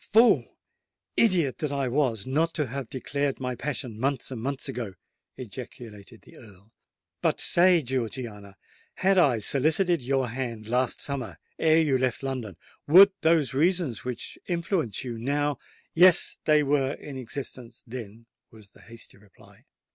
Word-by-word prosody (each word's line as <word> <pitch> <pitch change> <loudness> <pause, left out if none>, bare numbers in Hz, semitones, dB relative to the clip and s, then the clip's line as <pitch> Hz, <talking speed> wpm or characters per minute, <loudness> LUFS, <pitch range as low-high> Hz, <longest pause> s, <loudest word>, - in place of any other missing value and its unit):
"Fool—idiot 195 - +1
that 150 -2 -2
I 140 -2 -1
was 120 -6 0
not 160 +5 0
to 150 - 0
have 130 -1 -6
declared 140 +1 -2
my 125 -1 -3
passion 125 -3 -5
months 135 +1 -1
and 120 -4 -5
months 135 +3 -3
ago!" 120 -8 -5 0.4
ejaculated 115 -2 -10
the - - -17
Earl. 105 -1 -16 0.5
"But - - +1
say, 175 -2 +4
Georgiana—had 120 - -4
I 135 -9 +4
solicited 155 - +2
your 130 0 0
hand 115 -3 -5
last 125 +1 0
summer, 140 -4 -4 0.2
ere 160 0 +4
you 140 -5 +1
left 130 0 -1
London, 125 -9 -4 0.3
would 190 +6 +8
those 160 -4 +2
reasons 160 - +1
which 125 -1 -6
influence 170 - -1
you 120 -3 -6
now——" 145 +2 -1 0.3
"Yes—they 165 -3 +4
were 140 -1 +1
in 145 - -9
existence 125 -2 -7
then," 115 -2 -9 0.2
was 110 -3 -17
the - - -20
hasty 115 -3 -12
reply. 100 -2 -21
130 Hz, 140 wpm, -26 LUFS, 115-150 Hz, 0.5 s, would